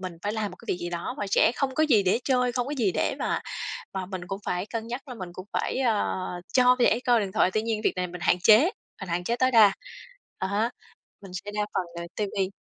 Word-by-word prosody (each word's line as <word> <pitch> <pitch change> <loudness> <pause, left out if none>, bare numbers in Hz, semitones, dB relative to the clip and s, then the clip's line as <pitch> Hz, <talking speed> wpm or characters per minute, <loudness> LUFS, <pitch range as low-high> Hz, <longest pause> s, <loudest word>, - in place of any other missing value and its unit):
mình 185 -2 -6
phải 205 +1 -1
làm 215 -2 -2
một - - -12
cái - - -17
việc - - +1
gì 175 0 -4
đó 175 +8 -4
mà 280 - -2
trẻ 205 +3 +4
không 265 -2 -1
có 310 - +2
gì 235 -9 +4
để 190 +3 +2
chơi, 250 -2 +2
không 245 0 -1
có 290 - -3
gì 215 -8 +1
để - - 0
mà - - -1 0.5
mà 190 -1 -3
mình 185 -2 -6
cũng 195 +2 -5
phải 180 +3 -1
cân 225 0 -4
nhắc 250 +5 -6
là 250 - -6
mình 185 -6 -7
cũng 185 +2 -9
phải, - - -1
ờ, 230 -5 +1 0.4
cho 250 0 +5
trẻ 235 -2 +4
coi 240 -3 +4
điện 195 -2 -3
thoại. 190 -3 +3
Tuy 215 - +2
nhiên 225 -1 -1
việc - - +3
này 180 0 0
mình 180 0 -9
hạn 175 - +3
chế, 215 +4 +8 0.4
mình 195 - -6
hạn 175 +1 -1
chế 235 +5 0
tối 255 0 +3
đa. 220 -4 +7 0.7
À 190 - -2
há, 210 +4 +1 0.5
mình 195 -2 -11
sẽ 205 - -5
đa 210 - 0
phần - - +1 0.2
là 170 - -6
ti 210 - 0
vi. 190 -1 0
210 Hz, 270 wpm, -26 LUFS, 185-240 Hz, 0.7 s, chế